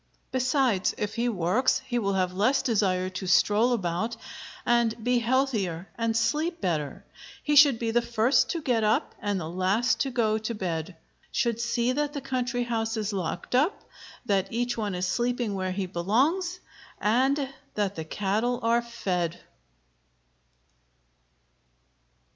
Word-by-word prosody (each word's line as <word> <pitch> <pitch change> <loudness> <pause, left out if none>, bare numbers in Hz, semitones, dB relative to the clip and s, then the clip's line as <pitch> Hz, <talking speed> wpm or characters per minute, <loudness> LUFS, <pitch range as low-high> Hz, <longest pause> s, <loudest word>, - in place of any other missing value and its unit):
Besides, 255 -6 +1
if 210 0 -2
he 240 +1 0
works 210 +6 +2
he 245 -2 -1
will 200 -3 0
have 185 -1 0
less 215 +9 +2
desire 190 -6 +1
to 185 0 -5
stroll 210 +6 +4
about, 220 +1 -1 0.5
and 235 -1 +2
be 245 +1 +2
healthier, 225 -8 0
and 230 -1 0
sleep 315 +8 0
better. 155 - -2 0.4
He 295 - +1
should 285 -4 +7
be 225 0 -1
the 240 +1 +3
first 235 +2 +2
to 335 -3 -2
get 240 -5 +1
up 215 0 +1
and 205 -2 -1
the 160 - -5
last 185 +8 +1
to 275 - 0
go 220 -4 +1
to 220 +2 -4
bed; 170 -3 -3 0.4
should 235 -2 0
see 235 +1 +1
that 290 +2 -1
the 290 - -3
country 250 -2 -1
house 225 -1 -2
is 215 -1 -2
locked 175 0 -4
up, 290 +10 +2 0.4
that 195 -3 0
each 240 +1 -1
one 210 -4 -2
is 180 +1 -1
sleeping 240 +2 -1
where 185 -1 -2
he 190 +1 -2
belongs, 270 - 0 0.4
and 265 +5 +1 0.2
that 205 -2 0
the 160 - -5
cattle 210 +8 -1
are 230 +1 +3
fed. 180 -8 -2
225 Hz, 150 wpm, -27 LUFS, 190-245 Hz, 0.5 s, should